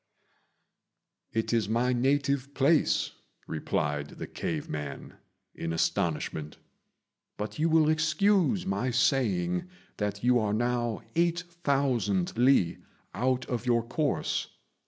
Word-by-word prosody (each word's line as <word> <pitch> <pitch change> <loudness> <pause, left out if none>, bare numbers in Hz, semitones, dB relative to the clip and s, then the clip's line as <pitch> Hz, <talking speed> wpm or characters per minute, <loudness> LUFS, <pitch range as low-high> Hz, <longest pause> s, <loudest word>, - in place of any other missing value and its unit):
"It 110 +1 -1
is 110 -3 +1
my 120 +3 +2
native 140 +2 +1
place," 145 +3 +3 0.3
replied 75 -2 -2
the - - -5
cave - - -4
man, 75 -2 -6 0.4
in 80 - -4
astonishment; 80 -2 -1 0.8
"but 105 +7 -5
you 165 +2 +2
will 160 -1 +4
excuse 175 +5 +2
my 190 -9 -1
saying 105 - +1 0.3
that 105 0 -3
you 125 0 +4
are 105 -2 0
now 120 -1 -1
8,000 140 - 0
li 120 -8 +3 0.3
out 130 0 0
of 125 0 -3
your 120 -1 +3
course. 140 +5 -1
125 Hz, 110 wpm, -29 LUFS, 100-145 Hz, 0.8 s, will